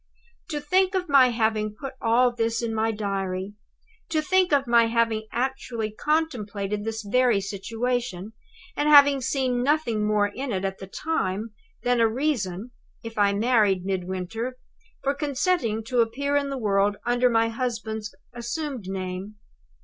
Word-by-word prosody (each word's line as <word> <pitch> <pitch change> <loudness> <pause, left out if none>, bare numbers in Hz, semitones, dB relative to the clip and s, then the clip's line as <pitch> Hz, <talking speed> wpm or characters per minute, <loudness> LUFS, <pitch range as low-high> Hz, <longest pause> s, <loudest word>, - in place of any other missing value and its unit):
"To 300 -2 -2
think 370 +6 +2
of 365 -1 -1
my 270 -3 +6
having 220 -2 0
put 270 -2 -6
all 245 +1 +3
this 230 0 -1
in 225 -1 -2
my 220 0 +1
Diary! 195 -2 -3 0.6
To 320 -1 +1
think 365 +3 +2
of 280 -2 +3
my 235 -1 +4
having 225 -1 0
actually 240 -3 -2
contemplated 210 -8 -1
this 225 0 -4
very 240 +1 +3
situation, 220 +1 -3 0.4
and 295 +1 +1
having 285 -2 +7
seen 255 -1 0
nothing 250 -6 +1
more 210 -1 +2
in 260 +5 -5
it, 190 0 -1
at 190 0 -3
the 190 - -8
time, 215 -5 -2 0.3
than 245 -1 +2
a 230 - +5
reason 230 -5 -2 0.3
(if 230 -1 -6
I 200 -1 +4
married 205 -4 +2
Midwinter) 190 +6 -3 0.5
for 275 - +1
consenting 285 - 0
to 245 +1 +1
appear 280 +6 -1
in 285 -1 +1
the 275 - -3
world 205 -2 +1
under 245 +1 +3
my 230 -1 +2
husband's 220 -3 -4 0.2
assumed 245 - -4
name! 190 +2 -5
230 Hz, 150 wpm, -25 LUFS, 210-265 Hz, 0.6 s, having